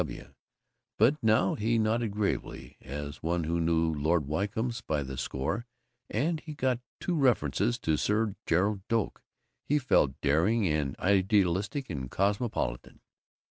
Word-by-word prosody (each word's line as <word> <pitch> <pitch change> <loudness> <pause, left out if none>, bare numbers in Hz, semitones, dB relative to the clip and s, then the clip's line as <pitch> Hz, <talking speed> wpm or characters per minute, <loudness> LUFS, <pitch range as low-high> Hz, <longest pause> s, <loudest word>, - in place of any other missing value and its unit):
W. - - -7
W., - - -16 0.6
but 140 +4 +3
now 110 -4 +3
he 115 +2 +1
nodded 115 +1 +1
gravely, 100 0 -3
as 70 +2 -6
one 85 +1 0
who 85 +2 -1
knew 80 0 +2
Lord 80 +1 +1
Wycombes 110 - -2
by 75 -7 -1
the 65 0 -6
score, 70 - -3 0.4
and 155 +8 0
he 155 -1 -8
got 130 -3 +1
in - - -23 0.2
two 180 - -2
references 90 - +2
to 80 -1 +1
Sir 105 +3 +1
Gerald 100 +4 +2
Doak. 115 -2 -1 0.4
He 150 - +1
felt 75 - +2
daring 90 +10 +2
and 75 -4 -1
idealistic 100 - +1
and 65 -5 -4
cosmopolitan. 100 - -1
100 Hz, 145 wpm, -29 LUFS, 75-115 Hz, 0.6 s, but